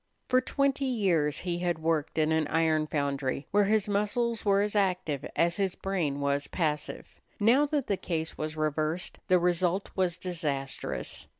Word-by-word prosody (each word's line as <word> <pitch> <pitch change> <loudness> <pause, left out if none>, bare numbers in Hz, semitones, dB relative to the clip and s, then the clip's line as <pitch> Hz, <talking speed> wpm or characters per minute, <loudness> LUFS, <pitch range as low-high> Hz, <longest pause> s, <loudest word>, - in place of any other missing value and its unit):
For 255 0 +4
twenty 275 +1 0
years 185 - +1
he 175 -1 -2
had 175 -2 0
worked 160 -2 -1
in 155 0 +2
an 160 -1 +2
iron 160 -1 +2
foundry, 140 -2 -1
where 205 0 +4
his 215 0 +2
muscles 210 +3 0
were 200 -1 +3
as 210 +1 -1
active 180 -8 0
as 170 0 +2
his 195 -2 0
brain 170 -8 -1
was 140 0 0
passive. 150 -4 -2 0.3
Now 245 +8 +4
that 285 -3 0
the 200 - 0
case 160 -3 -3
was 155 +1 -4
reversed, 155 +3 -1
the 185 - +5
result 180 +2 +1
was 185 -2 +1
disastrous. 140 - -4
175 Hz, 165 wpm, -29 LUFS, 155-200 Hz, 0.3 s, the